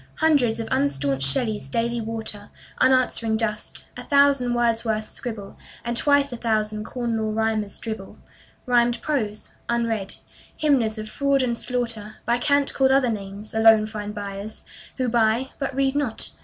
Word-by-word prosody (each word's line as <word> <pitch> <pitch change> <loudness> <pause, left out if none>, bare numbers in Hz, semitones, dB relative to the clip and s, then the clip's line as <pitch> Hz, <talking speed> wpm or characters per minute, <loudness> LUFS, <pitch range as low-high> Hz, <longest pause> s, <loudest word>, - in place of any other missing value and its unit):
Hundreds 285 -8 +2
of 225 - -4
unstaunched 140 -1 +3
Shelleys 210 - 0
daily 235 +7 -1
water 220 -2 -3 0.3
Unanswering 255 -4 +3
dust; 215 -1 -1
a - - -7
thousand 280 -4 +3
Wordsworths 225 -2 0
scribble; 220 -5 -6 0.3
And 235 0 -2
twice 285 +1 +3
a - - -5
thousand 215 -2 -1
Corn 240 -2 -3
Law 220 0 -1
Rhymers 220 -2 -1
dribble 220 -4 -6 0.5
Rhymed 240 -1 +2
prose, 220 -9 -2 0.2
unread. 230 -4 -1 0.4
Hymners 255 -8 +2
of 215 0 -5
fraud 275 +3 +1
and 240 -2 0
slaughter, 230 -4 -2
By 235 +1 +1
cant 285 +1 +2
called 265 -1 +3
other 265 -2 +3
names, 200 0 -7
alone 220 -1 +6
find 210 -1 -6
buyers 200 +1 -6 0.3
Who 255 -2 0
buy, 235 +2 +1
but 275 -2 -3
read 270 0 +1
not. 275 -7 0
230 Hz, 150 wpm, -23 LUFS, 215-255 Hz, 0.5 s, alone